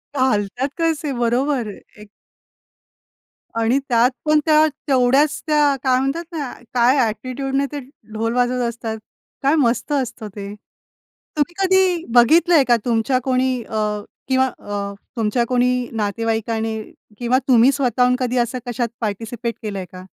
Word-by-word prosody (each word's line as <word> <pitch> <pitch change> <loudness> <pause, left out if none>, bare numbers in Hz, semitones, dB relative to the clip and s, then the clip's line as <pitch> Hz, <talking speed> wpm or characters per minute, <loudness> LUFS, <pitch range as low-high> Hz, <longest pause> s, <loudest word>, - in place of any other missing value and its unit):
घालतात 255 0 0
तसे 320 -3 0
बरोबर. 245 +1 +1 0.3
एक 210 0 -13 1.5
आणि 230 +3 +2
त्यात 240 +1 +4
पण 305 0 +4
त्या 310 -1 +5 0.2
तेवढ्याच 270 +3 +3
त्या 295 -2 +3
काय 255 -1 +3
म्हणतात 275 +6 -1
ना, 295 -6 -4 0.2
काय 250 +1 +4
एटिट्यूडने 265 +5 -2
ते 290 - -4 0.3
ढोल 225 +1 -1
वाजवत 250 0 +1
असतात, 225 -1 -5 0.5
काय 280 +3 +4
मस्त 255 -1 +1
असतं 245 -5 -2
ते. 200 -1 -6 0.8
तुम्ही 300 +3 0
कधी 375 -2 +2
बघितलंय 315 +6 +5
का? 240 - +5
तुमच्या 240 +2 +1
कोणी 255 -1 +1
अ, 220 0 -4 0.5
किंवा 260 0 +3
अ, 200 -1 -4 0.2
तुमच्या 225 +2 +1
कोणी 250 0 +1
नातेवाईकाने 225 +1 -1 0.4
किंवा 245 +2 +1
तुम्ही 250 0 +6
स्वतःहून 250 -2 +2
कधी 250 -1 -1
असं 245 +1 0
कशात 240 0 -2
पार्टिसिपेट 230 +2 -3
केलंय 200 -4 -4
का? 185 0 -10
250 Hz, 130 wpm, -20 LUFS, 225-275 Hz, 1.5 s, तुम्ही